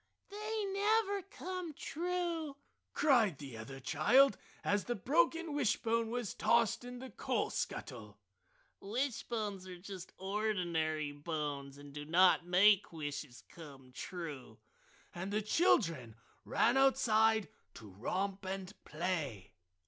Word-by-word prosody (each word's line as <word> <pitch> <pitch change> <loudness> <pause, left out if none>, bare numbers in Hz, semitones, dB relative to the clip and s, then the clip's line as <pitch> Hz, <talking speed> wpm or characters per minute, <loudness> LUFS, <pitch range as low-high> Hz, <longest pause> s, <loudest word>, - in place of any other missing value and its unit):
"They 425 +1 -3
never 405 +1 +1
come 365 -3 -6
true!" 335 -2 -3 0.3
cried 235 - +3
the 135 -4 -8
other 135 +5 -8
child 175 - +4 0.3
as 205 -1 +1
the 240 - -1
broken 325 - +1
wishbone 230 -4 +1
was 240 -3 -3
tossed 235 0 +2
in 245 0 -7
the 260 +1 -8
coal - - -1
scuttle. 105 -6 -5 0.6
"Wishbones 215 -4 -3
are 180 -1 -8
just 190 0 -9
ordinary 175 -7 -1
bones 145 -2 -4
and 145 0 -12
do 145 0 -6
not 175 +2 +4
make 195 +3 +5
wishes 145 -5 -6
come 140 -6 -12
true!" 145 - -7 0.6
And 185 +3 -5
the 210 +1 0
children 165 - +2 0.3
ran 240 +3 +3
outside 220 -5 +4 0.3
to 110 - -10
romp 190 - -2
and 190 0 -5
play. 150 - -3
195 Hz, 120 wpm, -35 LUFS, 150-255 Hz, 0.6 s, make